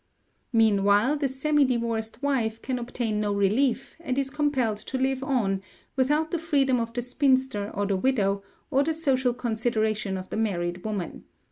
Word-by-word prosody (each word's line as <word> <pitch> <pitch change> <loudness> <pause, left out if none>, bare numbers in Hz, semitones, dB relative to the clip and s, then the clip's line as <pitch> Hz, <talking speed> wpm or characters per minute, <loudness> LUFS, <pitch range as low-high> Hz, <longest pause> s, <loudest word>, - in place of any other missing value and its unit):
Meanwhile 215 +3 +4
the 285 -1 0
semi 290 +3 +2
divorced 230 -1 -1
wife 230 -6 0
can 255 -2 -3
obtain 235 -3 -2
no 205 -1 0
relief, 225 +7 +1
and 270 -6 -3
is 275 -1 0
compelled 275 -7 0
to 260 +5 -4
live 265 0 0
on, 220 -9 0 0.3
without 295 +4 +1
the 345 - 0
freedom 275 -6 +2
of 230 0 -2
the 245 +1 -3
spinster 260 -4 +1
or 205 - 0
the 195 -1 0
widow, 200 -4 +1 0.3
or 275 -1 +4
the 320 +2 -1
social 260 -6 +1
consideration 220 -4 -1
of 185 0 -8
the - - -2
married 175 -5 -1
woman. 205 -6 -4
245 Hz, 165 wpm, -26 LUFS, 210-270 Hz, 0.3 s, Meanwhile